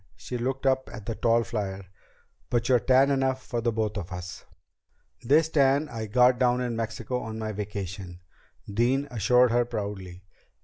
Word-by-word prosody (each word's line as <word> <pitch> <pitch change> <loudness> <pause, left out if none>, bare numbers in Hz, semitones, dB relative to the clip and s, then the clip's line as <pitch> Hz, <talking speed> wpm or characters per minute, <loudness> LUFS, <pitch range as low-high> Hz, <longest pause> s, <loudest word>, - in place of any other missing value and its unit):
She 125 - -7
looked 130 +3 -2
up 130 0 +1
at 110 -4 -9
the 115 - -2
tall 115 +1 +2
flier. 100 -4 -4 0.6
"But 120 -1 0
you're 125 -2 +4
tan 130 +3 +4
enough 130 -1 0
for 120 -1 -2
both 110 -2 -1
of 90 -4 -6
us." 90 0 -7 0.8
"This 150 +6 +4
tan 140 0 +3
I 115 -4 -5
got 125 +3 +4
down 125 -1 +3
in 120 -2 -2
Mexico 115 +2 -3
on 110 -2 -6
my 110 -1 -3
vacation," 100 -3 -6 0.5
Dean 125 +7 +1
assured 125 +2 +4
her 120 +1 +3
proudly. 100 -5 -6
115 Hz, 165 wpm, -27 LUFS, 105-130 Hz, 0.8 s, you're